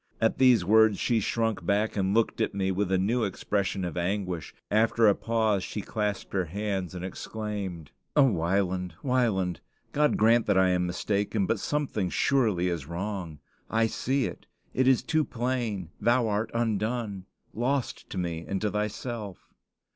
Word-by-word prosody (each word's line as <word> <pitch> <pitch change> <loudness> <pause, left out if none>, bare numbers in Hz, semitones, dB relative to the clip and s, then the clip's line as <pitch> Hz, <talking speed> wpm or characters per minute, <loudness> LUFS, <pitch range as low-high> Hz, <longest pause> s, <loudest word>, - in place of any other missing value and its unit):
At 115 - +1
these 125 -8 +5
words 110 0 +5
she 115 +3 +1
shrunk 115 -2 -1
back, 105 +5 +1
and 95 -2 +1
looked 115 -1 +1
at - - 0
me 95 -1 0
with 95 0 -1
a 95 - +4
new 110 +6 +1
expression 100 -1 -1
of 85 - -4
anguish. 90 -2 -2 0.2
After 110 +1 +4
a 100 - +6
pause, 110 -3 0
she 105 - -4
clasped 105 -1 -3
her 95 -2 +1
hands, 95 0 -3
and 90 0 -4
exclaimed: 95 -6 -5 0.2
"O 145 - +7
Wieland! 90 -4 0
Wieland! 110 -9 +1 0.3
God 150 +1 +2
grant 115 +1 +4
that 100 -2 +3
I 95 0 +5
am 90 -1 +1
mistaken! 100 +3 0
but 110 +2 0
something 135 -11 -1
surely 110 -10 +2
is 85 -6 -3
wrong. 85 -3 -5 0.3
I 115 0 +2
see 130 +3 0
it; 90 - -7 0.3
it 130 0 +2
is 130 -2 +4
too 155 -1 +1
plain; 120 - -2
thou 120 0 +3
art 105 +1 0
undone 110 -3 -1 0.3
lost 125 +3 -2
to - - -6
me 85 -2 -2
and 95 - -1
to 105 -1 0
thyself." 105 -2 -4
105 Hz, 165 wpm, -28 LUFS, 95-115 Hz, 0.3 s, O